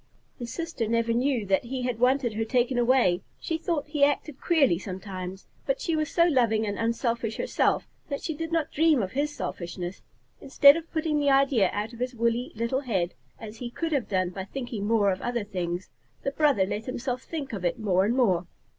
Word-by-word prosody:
His 240 -1 -5
sister 330 -9 -3
never 230 +1 +1
knew 245 -2 +1
that 195 +3 +1
he 255 +1 -4
had 245 -2 -2
wanted 250 -1 +2
her 220 +1 -1
taken 245 +2 +1
away. 235 -8 +3 0.2
She 325 -1 -2
thought 330 -3 -1
he 295 -1 0
acted 290 0 +1
queerly 280 - +3
sometimes, 190 -1 -6 0.2
but - - +1
she 335 -8 -1
was 310 -1 0
so 340 - +4
loving 235 -8 +2
and 205 -1 -3
unselfish 230 -1 -1
herself - - +1 0.2
that 280 - -4
she 320 - -2
did 325 +2 -5
not 330 -2 0
dream 310 -6 +3
of 185 - -4
his 285 +3 0
selfishness. 175 +1 -5 0.4
Instead 280 +1 +7
of 330 0 -6
putting 315 -2 0
the 285 -1 +2
idea 270 -8 +4
out 210 +3 -3
of 235 - -11
his 250 0 -2
woolly 235 +1 0
little 235 +4 0
head, 190 -10 -1 0.3
as 220 0 -9
he 240 +1 -5
could 325 +7 -3
have 280 -6 0
done 185 -2 0
by 190 +1 -5
thinking 235 -3 -4
more 210 -3 +3
of 185 - -3
other 240 -2 -1
things, 180 -3 -4 0.3
the 275 - -1
brother 285 -10 +3
let 210 +3 -4
himself 255 0 -3
think 280 -5 -6
of 195 -4 -4
it 175 - 0
more 190 -4 +2
and 225 +5 +1
more. 185 -9 +2
240 Hz, 210 wpm, -27 LUFS, 205-280 Hz, 0.4 s, Instead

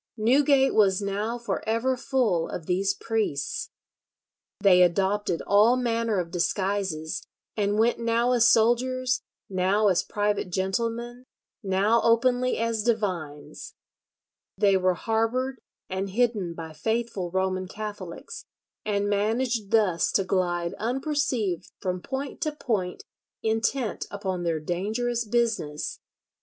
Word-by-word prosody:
Newgate 270 +4 +4
was 195 -3 +4
now 205 +4 -2
for 235 0 -3
ever 235 +4 +1
full 240 -10 0
of 165 - -6
these 195 +3 +1
priests. 215 - -2 0.9
They 190 -3 +6
adopted 190 +1 +1
all 210 +4 +5
manner 230 -3 0
of 170 -2 -4
disguises, 185 -3 -1 0.3
and 205 -1 0
went 230 +2 +2
now 235 +1 +1
as 240 -1 +5
soldiers, 250 +2 +2 0.3
now 195 +3 +2
as 185 - +3
private 205 -2 -1
gentlemen, 230 +7 -2 0.4
now 200 +3 +2
openly 245 +2 +3
as 230 -1 0
divines. 185 -10 -3 0.8
They 200 -1 +4
were 185 -1 +2
harboured 235 +6 -1 0.3
and 190 +1 -3
hidden 205 -5 0
by 160 -1 -7
faithful 220 0 -2
Roman 185 0 -1
Catholics, 205 -4 -7 0.4
and 205 -1 0
managed 220 +2 0
thus 205 -7 +2
to 195 - +3
glide 175 -2 0
unperceived 250 - -1
from 185 -1 -3
point 270 - -5
to 310 -3 0
point 215 -11 -2 0.4
intent 225 +2 -1
upon 190 -3 -3
their 165 -2 0
dangerous 220 +9 -2
business. 215 -10 -1
210 Hz, 120 wpm, -26 LUFS, 185-235 Hz, 0.9 s, They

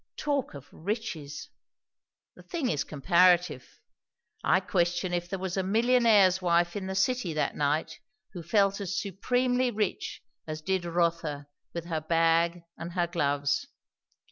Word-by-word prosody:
Talk 285 - -1
of 140 0 -10
riches! 170 -6 -5 0.9
The - - -14
thing 325 -7 -3
is 145 -2 0
comparative. 175 -1 +2 0.6
I 180 - +4
question 175 -1 0
if 175 0 -2
there 195 - -2
was 190 0 -4
a - - +2
millionaire's 215 -2 +4
wife 175 -1 +2
in 195 -2 -4
the 190 - -4
city 195 -3 +1
that 155 - 0
night 150 +2 -1 0.3
who 175 - -6
felt 195 +4 +2
as 190 -1 -2
supremely 245 +6 0
rich 210 -4 -3 0.2
as 155 0 -5
did 190 0 -1
Rotha 170 -4 -1 0.3
with 170 -1 -4
her 160 -2 -2
bag 165 +1 +2 0.2
and 170 +1 -6
her 175 -1 +1
gloves. 145 -4 0
175 Hz, 140 wpm, -28 LUFS, 165-200 Hz, 0.9 s, I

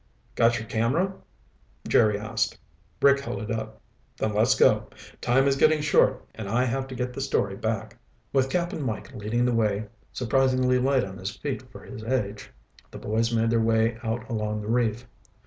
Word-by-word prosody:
"Got 115 0 +3
your 115 0 -6
camera?" 140 +13 +1 0.7
Jerry 105 -2 +4
asked. 110 +1 -2 0.5
Rick 140 0 +6
held 120 -7 -5
it 110 +2 -5
up. 85 - -4 0.4
"Then 110 - -1
let's 110 +3 +3
go. - - +3 0.3
Time 135 +3 +3
is 135 - +3
getting 155 +3 +4
short 150 -1 +2
and 105 -3 -6
I 120 +4 +2
have 135 +2 -2
to 130 - -8
get 125 0 -3
the 135 - -5
story 100 -8 0
back." 110 0 -3 0.3
With 135 -1 +2
Cap'n 175 0 -1
Mike 130 0 -4
leading 120 +1 -1
the 125 - +1
way, 110 -2 +1 0.3
surprisingly 130 0 +2
light 135 0 +2
on 95 0 -7
his 95 +2 -5
feet - - -5
for - - -12
his 110 - -9
age, 105 -4 -2 0.4
the - - -10
boys 115 +2 0
made 115 0 +1
their 115 -1 +3
way 115 +1 +2
out 115 0 -3
along 105 -3 -2
the 105 - -6
reef. 120 0 0
115 Hz, 180 wpm, -26 LUFS, 110-130 Hz, 0.7 s, Rick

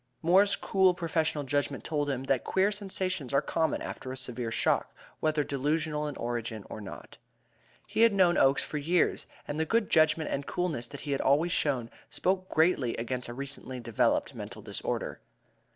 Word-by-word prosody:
Moore's 195 +4 +5
cool 190 -2 +3
professional 160 -4 0
judgment 145 0 -1
told 145 -2 -1
him 135 -2 -2
that 135 -2 +1
queer 190 +2 +2
sensations 185 -8 -2
are - - +6
common 160 -1 0
after 130 - -6
a 130 - -5
severe 125 -2 -3
shock, 115 - +1 0.3
whether 155 -1 +1
delusional 150 +2 -1
in 145 - -5
origin 115 -3 -4
or 110 - -6
not. 100 - -10 0.7
He 215 +2 -1
had 230 0 +7
known 185 -3 +4
Oakes 135 +1 +4
for 150 - -4
years, 170 +4 +1 0.2
and 145 - -3
the - - +3
good 225 +5 +1
judgment 155 0 +3
and 140 - -2
coolness 165 -9 -1
that 140 - -9
he 145 - -4
had 140 - 0
always 155 +6 +3
shown 130 -8 0 0.2
spoke 185 +5 0
greatly 160 -7 +2
against 120 +1 -3
a - - -5
recently 135 -1 -7
developed 115 -2 +1
mental - - -8
disorder. - - -3
150 Hz, 175 wpm, -29 LUFS, 130-175 Hz, 0.7 s, had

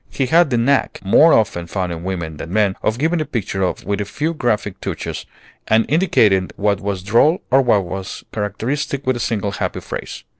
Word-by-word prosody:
He 135 - -1
had 165 +4 +4
the 120 - +1
knack, 130 +4 +1
more 155 +12 +6
often 85 - +1
found 90 0 -2
in 85 0 -6
women 85 -4 -4
than 80 +2 -7
men, 100 -1 +2
of 110 - 0
giving 160 +4 +1
a - - +1
picture 95 -6 -1
with 100 +1 -1
a - - -2
few 155 +10 -2
graphic 110 - -1
touches, - - -5 0.4
and 110 +1 +3
indicating 110 - +3
what 100 -1 0
was 100 -2 -3
droll 120 - +3
or 135 +1 +6
what 105 -7 +2
was 95 +2 -6
characteristic 130 +7 -3
with 130 0 +1
a - - -4
single 105 -4 -1
happy 105 - -3
phrase. - - -7
105 Hz, 195 wpm, -19 LUFS, 95-135 Hz, 0.4 s, more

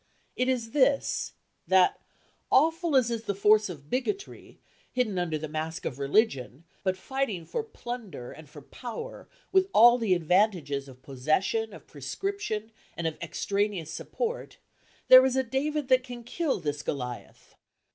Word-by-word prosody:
It 255 - 0
is 235 -3 -1
this, 280 0 +2 0.3
that, 185 -1 +4 0.5
awful 325 +2 +3
as 245 -3 +4
is 230 -1 -3
the 200 -1 -1
force 210 +1 +4
of 145 -5 -9
bigotry, 390 +10 -3 0.3
hidden 220 -7 0
under 165 -3 -1
the 155 +1 -5
mask 155 +3 -4
of 130 - -4
religion, 140 - +1 0.2
but 185 -1 0
fighting 220 -6 -2
for 465 - -2
plunder 240 - -7
and 155 -2 -12
for 145 -1 -12
power 250 - -8 0.2
with 380 0 +3
all 240 +2 +8
the 210 -6 +2
advantages 170 -5 +1
of 130 -1 -15
possession, 155 - 0
of 205 - -12
prescription, 305 - -4 0.3
and 170 - -3
of 160 -1 -1
extraneous 195 -1 -1
support, 475 - -4 0.5
there 255 0 +10
is 265 -1 +2
a 265 - +2
David 280 +3 -1
that 255 0 +5
can 245 -2 -8
kill 285 - -1
this 145 -3 -3
Goliath. 125 -5 -6
215 Hz, 150 wpm, -28 LUFS, 160-260 Hz, 0.5 s, there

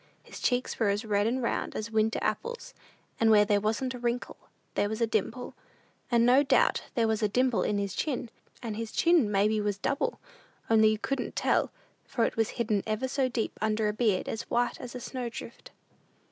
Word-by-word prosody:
His - - -11
cheeks 250 0 0
were 220 -3 +3
as 205 +3 -1
red 205 -1 +1
and 250 +2 -1
round 235 - -2
as 215 +1 -4
winter 220 0 +2
apples, 475 - -3 0.5
and 225 - +4
where 210 -1 +6
there 205 0 +2
wasn't 225 +5 -1
a 250 - -7
wrinkle 240 0 -2 0.4
there 205 - +1
was 220 +1 -3
a 230 - +3
dimple; 225 +3 -2 0.6
and 235 -1 +4
no 255 +3 +6
doubt 285 - +3
there 230 -3 +2
was 220 0 0
a 210 - +3
dimple 255 +2 +2
in 210 - 0
his 200 -2 -2
chin, 250 -6 -2 0.3
and 220 -3 -3
his 225 0 -5
chin 335 -11 +3
maybe 210 +2 +2
was 205 -1 -1
double, 275 +7 -1 0.5
only 220 -1 +6
you 215 0 +2
couldn't 260 +3 -3
tell, - - +2 0.4
for 235 -3 +1
it - - -2
was 225 0 +1
hidden 215 -4 +1
ever 215 +4 -1
so 260 0 0
deep 235 -2 -1
under 215 0 +1
a 210 - 0
beard 215 -4 +1
as 225 - -5
white 240 0 0
as 245 - -8
a - - -4
snow 245 0 -4
drift. - - -9
225 Hz, 205 wpm, -29 LUFS, 215-250 Hz, 0.6 s, where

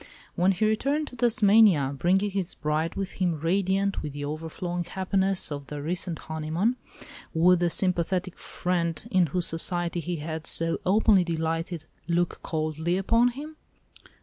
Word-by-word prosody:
When 180 +2 +3
he 195 +3 0
returned 275 +8 0
to - - -12
Tasmania, 210 - +4
bringing 190 +8 +1
his 190 -2 -2
bride 155 +2 -1
with 195 -1 -3
him 170 -4 +1
radiant 195 +4 0
with 150 - -6
the 145 0 -5
overflowing 165 +4 -4
happiness 190 0 +1
of 145 -1 -6
the 150 - -6
recent 170 +2 -3
honeymoon, 160 +11 -2 0.6
would 175 +2 +5
the 175 0 +2
sympathetic 180 +1 -1
"friend" 170 0 -2
in 185 -3 +3
whose 175 +4 -1
society 175 +1 -1
he 175 +2 -3
had 160 0 -5
so 165 0 +2
openly 200 -1 +4
delighted 165 0 -3 0.2
look 175 0 0
coldly 160 +2 -2
upon 230 +5 +3
him? 295 +5 -6
175 Hz, 150 wpm, -26 LUFS, 160-195 Hz, 0.6 s, would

